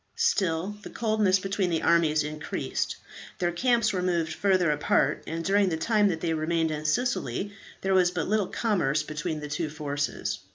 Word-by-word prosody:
Still 195 - +1
the - - -9
coldness 215 -4 +2
between 195 -1 -1
the 165 -2 -1
armies 155 -3 +3
increased, 150 0 -3 0.4
their 175 -1 0
camps 230 +2 +2
were 185 - -1
moved 170 -3 0
further 185 -3 +2
apart, 150 0 +1
and 165 +1 -4
during 200 0 +3
the 160 - -1
time 210 +4 +3
that 165 -4 -1
they 165 -2 0
remained 160 +1 0
in 155 0 -4
Sicily, 200 - -1 0.3
there 195 0 +1
was 185 -2 +5
but 175 -3 -3
little 210 -2 +1
commerce 155 -10 0
between 155 +1 -4
the 150 - -5
two 150 +2 -2
forces. 145 -1 -3
175 Hz, 175 wpm, -27 LUFS, 155-200 Hz, 0.4 s, was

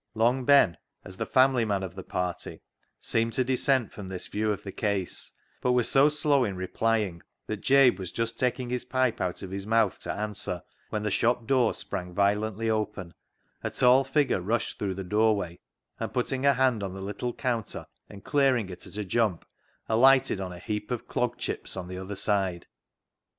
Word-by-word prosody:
Long 120 +3 +2
Ben, 140 - +5 0.3
as 95 - -9
the - - -3
family 130 -2 +4
man 100 -3 -1
of 95 -2 -5
the 95 - -7
party, 90 -1 -4 0.4
seemed 115 0 0
to 130 - +2
dissent 130 -2 +1
from 100 -2 -8
this 95 -1 -2
view 105 +1 -1
of 100 - -4
the 100 - -6
case, 100 -3 -2 0.3
but 125 - +2
was 125 -2 +2
so 140 +2 +5
slow 145 -2 +2
in 100 -5 -2
replying 95 -1 -1 0.2
that 110 -2 -5
Jabe 135 -2 +5
was 95 -2 -6
just 115 0 -3
taking 125 -1 -1
his 125 0 -1
pipe 130 -1 0
out 90 +1 -2
of 95 - -7
his 100 +1 -5
mouth 110 -3 +2
to - - -4
answer, 105 -4 -3 0.3
when 105 -1 -3
the 105 - -1
shop 120 +3 +1
door 125 -2 +2
sprang 90 -1 -4
violently 105 +2 +1
open, 105 -5 -2 0.5
a - - -1
tall 125 +2 +5
figure 135 -6 +1
rushed 115 +5 -2
through 95 -2 -2
the 95 - -5
doorway, 105 -3 +1 0.4
and - - -3
putting 130 +2 0
a 140 - +6
hand 125 -4 +2
on 95 -1 -4
the 95 - -7
little 105 +5 -3
counter 115 - -3 0.2
and 100 -1 -12
clear 135 -3 +3
ing 105 -5 -4
it 90 - -9
at - - -9
a 105 - -3
jump, 105 -3 0 0.4
alighted 130 -1 +4
on 95 -1 -4
a 90 - -8
heap 105 +4 -4
of 125 -2 -4
clog 125 -1 -1
chips - - -4
on 90 -1 -5
the 90 0 -6
other 95 +2 -6
side. 95 -4 +1
110 Hz, 200 wpm, -27 LUFS, 95-125 Hz, 0.5 s, a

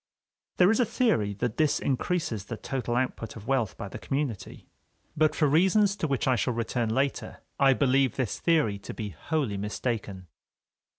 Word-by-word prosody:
There 180 +2 +6
is 225 - +1
a - - +5
theory 155 - +1
that 115 +2 -3
this 155 -2 +2
increases 130 - -1
the 115 - -6
total 125 -2 -3
output 125 -2 -2
of 110 -2 -10
wealth 125 -5 0
by - - -5
the - - -8
community. 135 -7 -4 0.5
But 155 0 +2
for 155 - +2
reasons 190 +7 +3
to 160 - -1
which 135 -3 -1
I 130 - +4
shall 125 0 -1
return 115 0 -1
later, 135 +4 -2 0.2
I 135 -1 +6
believe 135 -2 +2
this 125 -6 -2
theory 150 -12 +2
to - - -8
be 105 -3 -4
wholly 115 - -2
mistaken. 105 -2 -3
130 Hz, 175 wpm, -27 LUFS, 110-155 Hz, 0.5 s, There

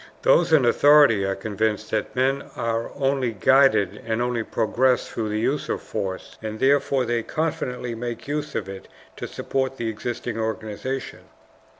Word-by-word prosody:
Those - - +4
in 150 -5 +5
authority 145 -5 +5
are 95 0 -1
convinced 110 +2 -2
that 110 -1 -2
men 135 +2 0
are 115 0 -2
only 135 -3 0
guided 110 -3 +3
and 115 0 -2
only 120 -1 0
progress 125 +4 +1
through 110 -2 -3
the 105 +1 -1
use 135 +6 -1
of - - -1
force, 95 -4 -5
and 110 0 -5
therefore 135 -1 +2
they 120 0 0
confidently 125 -4 -3
make 120 +1 -6
use 150 +1 -3
of 100 - -2
it 95 -1 -9 0.3
to - - -5
support 135 -1 -2
the 115 -2 -2
existing 115 +1 -4
organization. 110 +4 -4
120 Hz, 160 wpm, -24 LUFS, 110-135 Hz, 0.3 s, in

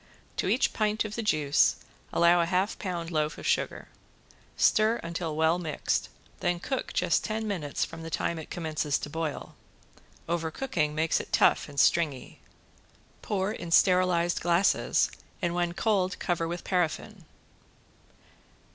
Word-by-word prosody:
To - - 0
each - - +2
pint 215 0 0
of 210 - -5
the 230 - -3
juice 155 -9 +3 0.4
allow 170 0 +4
a 170 - 0
half 185 +4 0
pound 175 -4 -4
loaf 155 -1 -1
sugar. - - -1 0.7
Stir 215 +2 +4
until 165 -2 -3
well 160 +2 +2
mixed, 155 -4 -2 0.3
then 175 0 0
cook 265 +7 -3
just - - +1
ten 220 0 -2
minutes 165 -9 -2
from 165 0 -10
the 165 - -6
time 165 +1 -1
it 160 - -9
commences 155 -3 -1
to 145 - -7
boil. 160 -1 -4 0.7
Overcooking 165 - -1
makes 160 +1 +1
it - - -8
tough - - +3
and 140 -1 -4
stringy. 145 -3 +1 0.8
Pour 195 -1 -1
in 170 -5 -6
sterilized 180 -1 +3
glasses 175 +3 +2 0.3
and 175 -3 -1
when 175 -1 -1
cold 195 -3 +1
cover 170 -2 -1
with 175 +1 -5
paraffin. 180 -4 -2
170 Hz, 140 wpm, -28 LUFS, 160-185 Hz, 0.8 s, allow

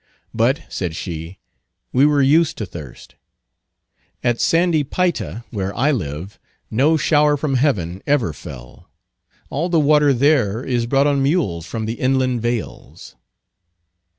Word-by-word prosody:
"But," 120 +5 +1
said 85 -4 -4
she, 85 0 -6 0.6
"we 135 +3 +5
were 145 -2 +3
used 155 +4 +3
to 105 - -3
thirst. 80 -8 -11 1.1
At 120 -1 +1
sandy 165 -2 +2
Payta, 135 - -2
where 100 -2 -4
I 140 +5 +3
live, 90 - -5 0.3
no 145 +8 +3
shower 150 -1 +3
from 145 -1 -2
heaven 100 - 0
ever 130 - +1
fell; 65 -6 -12 0.6
all 165 +6 -1
the 170 -2 +3
water 150 -1 +4
there 130 -5 +2
is 120 -3 -1
brought 135 +3 +2
on 140 -1 +2
mules 135 - 0
from 110 -2 -4
the 115 +2 -4
inland 130 -2 +1
vales." 120 -1 -5
130 Hz, 135 wpm, -20 LUFS, 100-145 Hz, 1.1 s, we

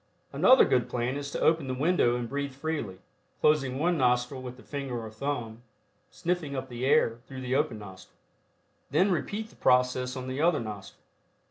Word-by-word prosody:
Another 260 +1 +6
good 125 -1 +1
plan 125 +1 -1
is 140 0 -4
to - - -4
open 160 -3 +3
the 130 - -2
window 145 -4 +2
and 120 -1 -3
breathe 140 +1 -4
freely, 140 -10 -3 0.4
closing 135 -4 +2
one 170 +2 +1
nostril 125 +1 +1
with 125 -1 -8
the - - -15
finger 135 -4 -4
or 110 -1 -7
thumb, 115 -2 -4 0.5
sniffing 170 -5 -2
up 130 0 -4
the 125 +1 -3
air 125 -6 +3
through 130 -1 -8
the 130 0 -2
open 135 -5 0
nostril. 95 -3 -12 0.7
Then 180 +8 +3
repeat 210 +5 -2
the - - -20
process 125 0 +2
on 130 0 -5
the 130 +3 -3
other 165 -1 +3
nostril. 105 -4 -8
130 Hz, 180 wpm, -28 LUFS, 125-150 Hz, 0.7 s, Another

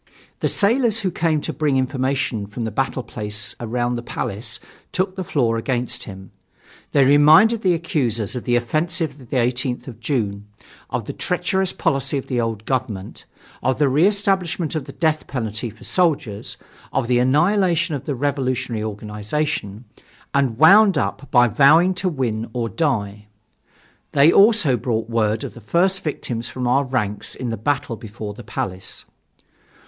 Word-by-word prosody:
The - - +1
sailors 225 +1 +2
who 190 -3 -1
came 160 -3 0
to - - -4
bring 150 -4 +1
information 130 -4 -1
from 110 +3 -5
the 110 - -3
battle 130 +2 -1
place 105 -2 -2
around 120 +1 -1
the - - -4
Palace 115 -2 -4 0.3
took 185 0 -1
the 190 - -3
floor 120 -9 0
against 120 +1 -2
him. 95 -2 -10 0.6
They 140 -2 +4
reminded 155 - +6
the 185 -4 +3
accusers 125 - -1
of 125 - -5
the 120 - +2
offensive 155 +4 -1
of 125 -4 -15
the 135 - -1
18th 125 +1 -1
of 115 -4 -9
June, 105 -6 -2 0.4
of - - -3
the - - -5
treacherous 190 -1 0
policy 135 +1 0
of 135 - -4
the 125 -2 -1
old 110 -2 -3
government, 120 -7 -3 0.4
of 130 0 +1
the 150 - +3
re 150 +7 +4
establishment 190 -5 0
of 155 -4 -3
the - - -9
death 155 -2 0
penalty 115 -2 -3
for 110 +1 -15
soldiers, 150 - 0 0.3
of 130 -3 0
the 125 0 +3
annihilation 170 +5 +2
of 140 -2 -4
the 145 - -2
revolutionary 130 -4 -1
organization, 105 +2 -3 0.5
and 135 -5 +1
wound 195 - +7
up 140 0 -2
by 120 -1 +5
vowing 150 - +5
to 185 +1 -1
win 115 -8 -2
or 115 -2 -2
die. 105 - -2 0.9
They 145 +3 +6
also 200 - +5
brought 115 0 -2
word 110 -1 +1
of - - -6
the 120 - -12
first 180 - +1
victims 120 -6 -4
from 125 -1 -3
our 135 +3 +3
ranks 105 -6 -2
in 125 -2 -4
the - - -1
battle 125 +2 -1
before 105 -2 -7
the 120 +3 -11
Palace. 95 -2 -5
130 Hz, 165 wpm, -21 LUFS, 115-155 Hz, 0.9 s, wound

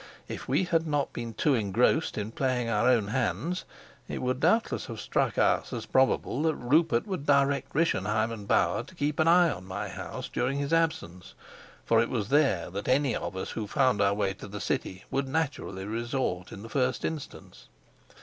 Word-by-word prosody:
If - - -7
we - - +2
had 165 -2 +1
not 145 -2 -1
been 115 -2 -5
too 150 - +2
engrossed 120 +7 +1
in 105 +1 -3
playing 125 -1 0
our 115 +2 +2
own 115 -5 +2
hands, 145 - -1 0.4
it - - -4
would 130 0 -1
doubtless 225 +9 +1
have 115 -4 -7
struck - - 0
us - - +2
as 115 -3 -4
probable 130 +2 +2
that 160 -1 +1
Rupert 130 0 +2
would 185 -8 -5
direct 140 -1 +2
Rischenheim 110 -8 +1
and 105 -3 -7
Bauer - - +2
to 185 - -14
keep 150 -2 -1
an 155 - +3
eye 175 -1 +6
on 95 - -6
my 95 +2 -4
house - - -6
during 130 +3 -1
his 140 +2 -2
absence; 160 - -1 0.5
for 115 -1 +4
it 115 - -1
was 110 -4 -2
there 135 - +2
that 100 +2 -5
any 135 -1 +2
of 95 - -4
us 95 - -4
who 110 -2 -4
found 130 -4 +2
our 100 0 +3
way 100 -2 0
to 95 - -10
the 105 +1 -7
city 95 -1 -3
would 135 0 0
naturally 135 -10 -2
resort 115 -4 -2
in 100 - -9
the 115 - -9
first 130 -1 0
instance. 155 -4 -7
125 Hz, 195 wpm, -28 LUFS, 105-145 Hz, 0.5 s, eye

